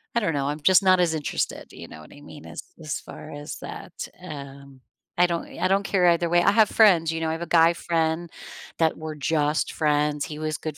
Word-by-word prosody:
I - - +4
don't 165 -8 -1
know, 140 -1 -1
I'm 145 +1 -3
just 185 +5 +5
not 185 -1 +5
as 170 -2 +2
interested, 150 -2 -3
do - - -15
you - - -9
know 80 - -12
what 75 - -16
I 145 - -15
mean, 145 0 -13
as - - -8 0.2
as 155 -1 -4
far 155 - -11
as 145 +1 -7
that, - - -8 0.3
um, 140 -4 -10 0.4
I 175 - +5
don't 170 -1 -3
I - - +2
don't 195 +1 +2
care 190 -2 +2
either 170 0 +2
way. 175 +1 +3
I 200 - +5
have 215 0 +4
friends, 175 -7 +4
you 165 - -3
know, 160 - -1
I - - -1
have 165 +1 -4
a 170 - -4
guy 165 0 +5
friend 165 0 -1 0.5
that 160 -1 +2
we're 155 -1 -6
just 150 +1 0
friends 150 -1 0
he 150 - -7
was 155 0 -2
good 155 -2 -6
160 Hz, 245 wpm, -24 LUFS, 150-175 Hz, 0.5 s, just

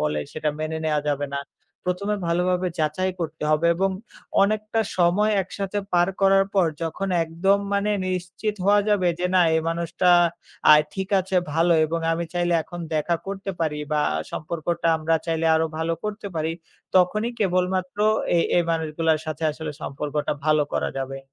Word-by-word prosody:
বলে 75 0 0
সেটা 155 -1 -2
মেনে 155 +1 -3
নেওয়া 150 -1 +1
যাবে 145 0 0
না। - - -1 0.5
প্রথমে 200 +3 -1
ভালোভাবে 180 +2 +1
যাচাই 155 +5 0
করতে 160 -1 -4
হবে 155 +2 +3
এবং 195 +2 +1 0.5
অনেকটা 215 +2 0 0.2
সময় 185 +5 +3
একসাথে 195 +2 -4
পার 175 0 +4
করার 195 0 +5
পর 190 -3 +4 0.2
যখন 165 +4 -3 0.2
একদম 175 +5 +2
মানে 200 +1 +1 0.2
নিশ্চিত 185 +4 -3
হওয়া 205 +1 +5
যাবে 200 -4 +3
যে 180 - 0
না 185 - +6
এই 160 - +3
মানুষটা 170 +2 0 0.6
আ - - +11 0.2
ঠিক 190 0 -3
আছে, 185 0 -2 0.2
ভালো 165 +3 +3
এবং 165 +2 -2
আমি 170 +1 -1
চাইলে 175 0 +1
এখন 175 +2 -9
দেখা 155 +3 +1
করতে 195 0 -4
পারি 155 -2 0 0.2
বা 150 - +2 0.3
সম্পর্কটা 170 +2 -3
আমরা 160 +1 0
চাইলে 165 0 0
আরও 160 0 +2
ভালো 160 +1 0
করতে 210 0 -4
পারি। 160 +1 -1 0.4
তখনই 210 +6 +3
কেবলমাত্র 185 -1 0 0.4
এ - - +4 0.2
এই 175 - +4
মানুষগুলোর 160 -1 0
সাথে 155 0 -5
আসলে 155 0 -6
সম্পর্কটা 145 +1 -2
ভালো 155 -1 +4
করা - - 0
যাবে। 135 0 -4
170 Hz, 165 wpm, -24 LUFS, 160-190 Hz, 0.6 s, আ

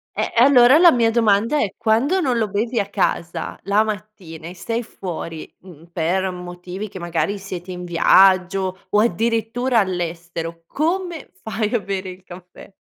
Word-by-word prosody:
Eh, - - -2
e 235 - +4
allora 260 0 +7
la 345 0 +7
mia 230 -3 +2
domanda 225 +4 +2
è 200 -7 -1
quando 240 +11 +2
non 255 -7 0
lo 220 -2 0
bevi 225 +5 -1
a 200 - -1
casa 190 -4 -2
la 200 +3 +2
mattina 190 -6 -7
e 180 - -9
sei 230 +6 -3
fuori, 165 -6 -7
mhmm, 170 -4 -15
per 180 +3 0
motivi 180 +2 -7
che 190 - -9
magari 175 +4 -2
siete 185 -2 -7
in 180 0 -6
viaggio 185 +2 +3
o 210 - +2
addirittura 230 +3 +1
all'estero, 170 -3 -4
come 340 +1 -2
fai 220 0 -3
a 240 - +2
bere 195 -1 -4
il 185 0 -11
caffè? 180 +1 -13
195 Hz, 165 wpm, -21 LUFS, 180-230 Hz, -, allora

